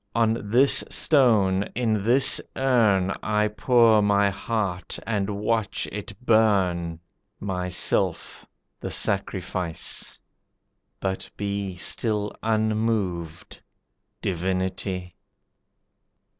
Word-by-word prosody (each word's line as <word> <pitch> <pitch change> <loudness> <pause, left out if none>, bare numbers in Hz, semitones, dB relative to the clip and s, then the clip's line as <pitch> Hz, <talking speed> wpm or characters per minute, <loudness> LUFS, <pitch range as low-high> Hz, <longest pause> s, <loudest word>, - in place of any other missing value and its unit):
On 115 -2 0
this 130 +5 +5
stone, 110 -10 +3
in 110 -4 0
this 125 +5 +4
urn 110 -8 +2
I 105 0 +1
pour 115 -1 +4
my 100 -1 +3
heart 95 -4 -3
and 105 -3 -1
watch 105 +1 -1
it 105 0 -6
burn, 95 -7 +2 0.4
Myself 90 -2 -1 0.4
the - - -5
sacrifice; 95 -3 -3 0.8
but 95 -1 -3
be 100 -2 -3
Still 105 +3 -1
unmoved: 110 -6 -2 0.6
Divinity." 95 0 -3
100 Hz, 80 wpm, -24 LUFS, 95-110 Hz, 0.8 s, this